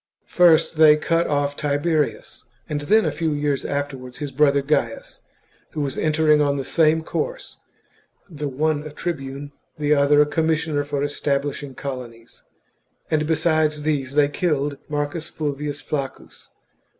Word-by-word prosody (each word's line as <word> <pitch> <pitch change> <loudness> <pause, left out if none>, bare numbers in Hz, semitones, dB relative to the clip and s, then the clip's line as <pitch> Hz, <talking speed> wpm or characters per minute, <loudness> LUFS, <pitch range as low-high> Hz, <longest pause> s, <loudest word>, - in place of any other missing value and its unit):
First 165 -2 +4
they 155 -1 +7
cut 165 +2 +1
off 145 -1 0
Tiberius, 150 +1 -1 0.2
and 145 -1 -3
then, 215 +9 +3
a - - +1
few 160 -2 -1
years 145 -2 -1
afterwards, 135 -3 -4
his 145 -2 -5
brother 140 0 +3
Gains, 135 -6 -2 0.5
who 155 - -2
was 140 -1 -2
entering 155 -1 +3
on 140 -1 +1
the 135 - -3
same 160 +1 +3
course - - -4 0.4
— - - -34 0.2
the 150 -5 -5
one 150 +2 0
a 155 - -8
tribune, 145 -3 -5 0.3
the 150 0 +2
other 145 0 +4
a 150 - +6
commissioner 160 -1 0
for 145 -1 -2
establishing 145 -1 -2
colonies; 125 -4 -8 0.7
and 155 -1 +1
besides 155 -2 +1
these 140 -3 -1
they 145 -1 +5
killed 145 -2 -1
Marcus 150 +2 -3
Fulvius 145 -1 -4
Flaccus. 140 -3 -6
145 Hz, 145 wpm, -22 LUFS, 140-155 Hz, 0.7 s, they